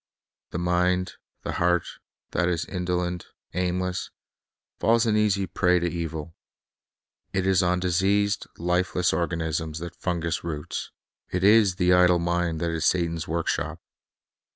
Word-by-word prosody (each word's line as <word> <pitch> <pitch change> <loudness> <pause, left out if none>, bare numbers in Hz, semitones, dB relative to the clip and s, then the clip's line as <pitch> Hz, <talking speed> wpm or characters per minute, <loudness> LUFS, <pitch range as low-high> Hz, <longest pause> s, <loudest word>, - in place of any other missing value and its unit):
The - - -4
mind, 90 +1 +1 0.3
the - - -3
heart, 90 -1 +2 0.5
that 90 0 +1
is 85 -2 -1
indolent, 90 -1 -2 0.3
aimless, 90 0 -1 0.7
falls 115 +1 +3
an 110 -2 +2
easy 100 -2 +2
prey 90 0 +2
to 85 0 0
evil. 80 -2 -4 1.0
It 95 -1 0
is 95 -1 +4
on 90 0 +2
diseased, 100 +3 +1
lifeless 90 +1 +1
organisms 80 -2 -2
that 85 +1 -6
fungus 85 -2 -2
roots. 75 -3 -4 0.4
It 90 0 -2
is 105 -2 +6
the 90 0 +3
idle 90 -1 +5
mind 85 -1 -1
th.it 85 -1 0
is 80 - -2
Satan's 85 -2 +1
workshop. 80 -1 -2
90 Hz, 130 wpm, -26 LUFS, 85-90 Hz, 1.0 s, is